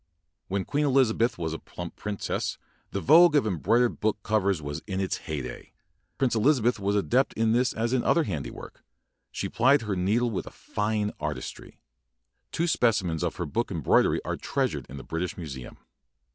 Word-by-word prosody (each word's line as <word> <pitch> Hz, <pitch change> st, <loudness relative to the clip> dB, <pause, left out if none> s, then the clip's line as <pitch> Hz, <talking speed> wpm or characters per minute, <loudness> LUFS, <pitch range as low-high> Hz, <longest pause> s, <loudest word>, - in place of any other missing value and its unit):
When 95 Hz, 0 st, -2 dB
Queen 145 Hz, +1 st, 0 dB
Elizabeth 125 Hz, -4 st, +2 dB
was 80 Hz, -2 st, -3 dB
a 80 Hz, -, -5 dB
plump -, -, -8 dB
princess, 105 Hz, -1 st, -3 dB, 0.3 s
the -, -, -3 dB
vogue 165 Hz, +3 st, +7 dB
of 145 Hz, -, +4 dB
embroidered 115 Hz, +6 st, +1 dB
book 110 Hz, -1 st, +1 dB
covers 100 Hz, -4 st, +1 dB
was 75 Hz, +1 st, -5 dB
in 95 Hz, -2 st, -2 dB
its 95 Hz, -1 st, -1 dB
heyday. 75 Hz, -4 st, -5 dB, 0.4 s
Prin 130 Hz, -3 st, +1 dB
cess -, -, +1 dB
Elizabeth 125 Hz, -3 st, +3 dB
was 100 Hz, +1 st, 0 dB
adept 125 Hz, +6 st, +2 dB
in 110 Hz, 0 st, +1 dB
this 120 Hz, +2 st, +2 dB
as 115 Hz, +2 st, -1 dB
in 130 Hz, -, +2 dB
other 170 Hz, -, +3 dB
handiwork. 75 Hz, -, -6 dB, 0.5 s
She -, -, -3 dB
plied 130 Hz, +3 st, +3 dB
her 105 Hz, -3 st, -2 dB
needle 110 Hz, +7 st, +1 dB
with 100 Hz, -, -3 dB
a -, -, -5 dB
fine 105 Hz, 0 st, -2 dB
artistry. 75 Hz, 0 st, -6 dB, 0.7 s
Two 170 Hz, -, 0 dB
specimens 105 Hz, -, +1 dB
of 85 Hz, -, -1 dB
her 90 Hz, -, -3 dB
book 115 Hz, +10 st, -2 dB
embroidery 80 Hz, -8 st, +2 dB
are -, -, -2 dB
treasured -, -, -2 dB
in 70 Hz, -, -8 dB
the 65 Hz, -, -8 dB
British 85 Hz, +2 st, -3 dB
Museum. 70 Hz, -8 st, -7 dB
105 Hz, 175 wpm, -27 LUFS, 90-120 Hz, 0.7 s, vogue